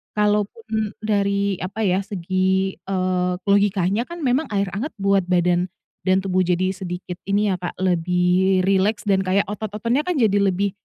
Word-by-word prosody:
kalaupun 210 Hz, +1 st, -1 dB
dari 200 Hz, -2 st, 0 dB
apa 200 Hz, +4 st, -4 dB
ya, 185 Hz, -1 st, +2 dB
segi, 190 Hz, 0 st, -1 dB
eee, 185 Hz, -1 st, -1 dB
logikanya 200 Hz, +2 st, +2 dB
kan 345 Hz, -1 st, -7 dB
memang 265 Hz, +4 st, +1 dB
air 200 Hz, -2 st, -1 dB
anget 230 Hz, -, -4 dB
buat 195 Hz, -2 st, +1 dB
badan 180 Hz, 0 st, +2 dB, 0.4 s
dan 185 Hz, +1 st, +3 dB
tubuh 185 Hz, -1 st, +1 dB
jadi 180 Hz, +1 st, +1 dB
sedikit 180 Hz, -1 st, -6 dB
ini 205 Hz, +1 st, +2 dB
ya, 185 Hz, -, -1 dB
Kak, 175 Hz, 0 st, -5 dB
lebih 180 Hz, +1 st, +2 dB
rileks 195 Hz, +3 st, +1 dB
dan 195 Hz, -1 st, +4 dB
kayak 190 Hz, +2 st, +2 dB
otot-ototnya 215 Hz, -, -2 dB
kan 360 Hz, -, 0 dB
jadi 205 Hz, -3 st, +3 dB
lebih 200 Hz, 0 st, +1 dB
195 Hz, 155 wpm, -22 LUFS, 185-210 Hz, 0.4 s, dan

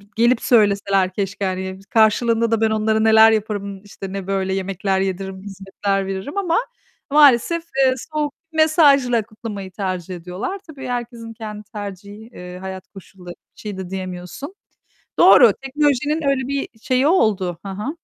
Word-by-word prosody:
b -, -, -19 dB
"Gelip 235 Hz, +1 st, +3 dB
söyleseler 200 Hz, -4 st, +3 dB
keşke." 200 Hz, +1 st, -3 dB
hani. 190 Hz, 0 st, -3 dB
Karşılığında 230 Hz, +1 st, +3 dB
da 225 Hz, -1 st, +1 dB
ben 220 Hz, -1 st, +2 dB
onlara 220 Hz, 0 st, +1 dB
neler 220 Hz, 0 st, +7 dB
yaparım, 205 Hz, -2 st, -3 dB
işte, 195 Hz, -1 st, -9 dB
ne 195 Hz, -1 st, -5 dB
böyle 190 Hz, -1 st, -1 dB
yemekler 195 Hz, 0 st, -1 dB
yediririm, 190 Hz, 0 st, -4 dB
hizmetler 195 Hz, 0 st, -3 dB
veririm 195 Hz, -, -5 dB
ama 350 Hz, -4 st, +1 dB, 0.5 s
maalesef, 295 Hz, +3 st, +5 dB, 0.2 s
eee, 260 Hz, -, +3 dB, 0.2 s
soğuk 300 Hz, -1 st, -1 dB, 0.2 s
bir -, -, -10 dB
mesajla 280 Hz, -7 st, +4 dB
kutlamayı 210 Hz, -2 st, -8 dB
tercih 185 Hz, -2 st, -4 dB
ediyorlar. 180 Hz, -, -5 dB
Tabii 290 Hz, -4 st, -9 dB
herkesin 240 Hz, -2 st, -5 dB
kendi 215 Hz, -2 st, -8 dB
tercihi, 205 Hz, +1 st, -8 dB
eee, 180 Hz, -2 st, -9 dB
hayat 190 Hz, 0 st, -8 dB
koşulları. 185 Hz, -2 st, -12 dB, 0.2 s
Bir -, -, -15 dB
şey 210 Hz, -2 st, -6 dB
de 190 Hz, -1 st, -7 dB
diyemiyorsun. 185 Hz, -, -7 dB, 0.7 s
Doğru, -, -, +8 dB
teknolojinin 290 Hz, +2 st, 0 dB
öyle 265 Hz, -2 st, 0 dB
bir 280 Hz, 0 st, -2 dB
şeyi 255 Hz, +3 st, +1 dB
oldu. 200 Hz, -, +1 dB
Hı 195 Hz, -, -5 dB
hı. 210 Hz, -, -5 dB
210 Hz, 155 wpm, -20 LUFS, 190-245 Hz, 0.7 s, Doğru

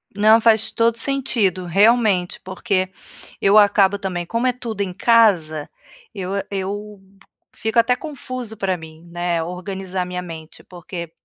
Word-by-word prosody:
Não, 215 Hz, +2 st, +5 dB
faz 220 Hz, -1 st, +3 dB
todo 230 Hz, 0 st, +1 dB
sentido, 230 Hz, -9 st, +1 dB
realmente, 200 Hz, 0 st, +2 dB
porque 185 Hz, 0 st, -2 dB, 0.5 s
eu 200 Hz, +2 st, +4 dB
acabo 200 Hz, -1 st, +4 dB
também, 180 Hz, -3 st, -3 dB
como 230 Hz, +7 st, -1 dB
é 250 Hz, -, +2 dB
tudo 230 Hz, -4 st, -5 dB
em 195 Hz, -2 st, -2 dB
casa, 180 Hz, -9 st, +3 dB, 0.5 s
eu 190 Hz, -2 st, -4 dB, 0.2 s
eu 205 Hz, +1 st, -5 dB, 0.6 s
fico 220 Hz, +2 st, -3 dB
até 235 Hz, +2 st, +4 dB
confuso 255 Hz, -6 st, -7 dB
para 195 Hz, -2 st, -1 dB
mim, 160 Hz, 0 st, -13 dB
né, 175 Hz, -1 st, -1 dB
organizar 185 Hz, +1 st, -5 dB
minha 180 Hz, 0 st, -5 dB
mente 160 Hz, -2 st, -10 dB
porque, 175 Hz, -1 st, -8 dB
195 Hz, 140 wpm, -20 LUFS, 180-225 Hz, 0.6 s, Não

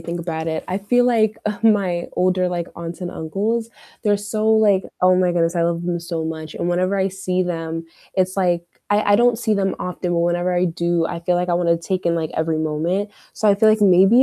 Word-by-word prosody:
think 170 Hz, +1 st, -5 dB
about 160 Hz, -1 st, -4 dB
it. 160 Hz, -1 st, -3 dB
I 185 Hz, +2 st, -1 dB
feel 245 Hz, +5 st, +2 dB
like, 220 Hz, -3 st, +2 dB
uh, 210 Hz, -1 st, -2 dB
my 195 Hz, -6 st, +2 dB
older, 185 Hz, 0 st, +1 dB
like, 175 Hz, -1 st, -3 dB
aunts 170 Hz, +1 st, -7 dB
and 175 Hz, -, -4 dB
uncles, 210 Hz, +9 st, -2 dB, 0.3 s
they're 205 Hz, -2 st, +3 dB
so 215 Hz, +2 st, -2 dB
like 210 Hz, -3 st, +4 dB, 0.2 s
Oh 185 Hz, 0 st, +6 dB
my 180 Hz, -1 st, +2 dB
goodness, 170 Hz, 0 st, +1 dB
I 170 Hz, -, +1 dB
love 170 Hz, 0 st, 0 dB
them 175 Hz, -1 st, -2 dB
so 165 Hz, -1 st, -4 dB
much, 160 Hz, -1 st, -6 dB
and 175 Hz, -, -2 dB
whenever 185 Hz, +3 st, +1 dB
I 190 Hz, 0 st, +1 dB
see 185 Hz, -1 st, -2 dB
them, 165 Hz, -2 st, -4 dB, 0.3 s
it's 185 Hz, 0 st, 0 dB
like 175 Hz, -2 st, +1 dB, 0.3 s
I 205 Hz, 0 st, +2 dB
I -, -, +6 dB
don't 240 Hz, 0 st, +3 dB
see 225 Hz, -2 st, 0 dB
them 195 Hz, -2 st, 0 dB
often, 180 Hz, -1 st, -3 dB
but 170 Hz, -, +1 dB
whenever 175 Hz, +1 st, 0 dB
I 175 Hz, +1 st, +2 dB
do, 170 Hz, -1 st, 0 dB
I 170 Hz, -1 st, -5 dB
feel 175 Hz, +1 st, +1 dB
like 180 Hz, 0 st, -1 dB
I -, -, +2 dB
wanna 170 Hz, -1 st, +2 dB
take 185 Hz, +2 st, -3 dB
in, 170 Hz, -, +2 dB
like, 160 Hz, -2 st, -2 dB
every 160 Hz, 0 st, 0 dB
moment, 165 Hz, +6 st, -1 dB, 0.2 s
so 215 Hz, -, -1 dB
I 200 Hz, -, +6 dB
feel 215 Hz, +2 st, +4 dB
like 215 Hz, 0 st, +3 dB
maybe 195 Hz, +5 st, +6 dB
180 Hz, 235 wpm, -20 LUFS, 170-205 Hz, 0.3 s, Oh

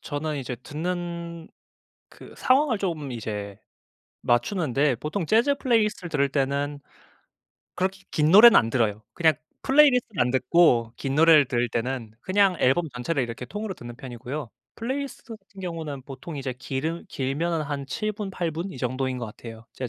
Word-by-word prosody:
저는 150 Hz, 0 st, -3 dB
이제 130 Hz, -2 st, -4 dB
듣는 170 Hz, +1 st, -5 dB, 0.6 s
그 -, -, -14 dB
상황을 260 Hz, -2 st, +3 dB
좀 165 Hz, -8 st, -3 dB
이제 105 Hz, -3 st, -5 dB, 0.7 s
맞추는데 135 Hz, -, +1 dB
보통 155 Hz, -, -3 dB
재즈 235 Hz, -, +3 dB
플레이리스트를 215 Hz, -9 st, 0 dB
들을 140 Hz, -3 st, +2 dB
때는 140 Hz, +1 st, -1 dB, 0.9 s
그렇게 190 Hz, +1 st, -2 dB
긴 150 Hz, 0 st, +2 dB
노래는 220 Hz, +5 st, +9 dB
안 115 Hz, -, +1 dB
들어요. 110 Hz, -3 st, 0 dB
그냥 160 Hz, -2 st, +4 dB, 0.3 s
플레이리스트는 260 Hz, -, +4 dB
안 125 Hz, 0 st, +3 dB
듣고 125 Hz, -3 st, +3 dB
긴 135 Hz, -1 st, -3 dB
노래를 155 Hz, -1 st, +6 dB
들을 120 Hz, 0 st, 0 dB
때는 120 Hz, -2 st, -3 dB
그냥 195 Hz, 0 st, +3 dB
앨범 150 Hz, +7 st, +3 dB
전체를 125 Hz, +4 st, -2 dB
이렇게 120 Hz, +1 st, -5 dB
통으로 210 Hz, -, -4 dB
듣는 120 Hz, -8 st, -10 dB
편이고요. 125 Hz, +1 st, -6 dB, 0.2 s
플레이리스트 260 Hz, -1 st, -5 dB
같은 200 Hz, -2 st, -16 dB
경우는 160 Hz, -6 st, -5 dB
보통 135 Hz, +4 st, -8 dB
이제 135 Hz, -2 st, -3 dB
길으 140 Hz, +7 st, -4 dB
길면은 155 Hz, +5 st, -1 dB
한 140 Hz, -2 st, -4 dB
7 215 Hz, +9 st, -2 dB
분, 210 Hz, -1 st, -5 dB
8 175 Hz, -3 st, -2 dB
분 170 Hz, +5 st, -4 dB
이 135 Hz, -, -9 dB
정도인 130 Hz, +1 st, -2 dB
것 120 Hz, -, -4 dB
같아요. 115 Hz, +1 st, -10 dB
제가 130 Hz, -2 st, -5 dB
150 Hz, 345 characters per minute, -25 LUFS, 125-185 Hz, 0.9 s, 노래는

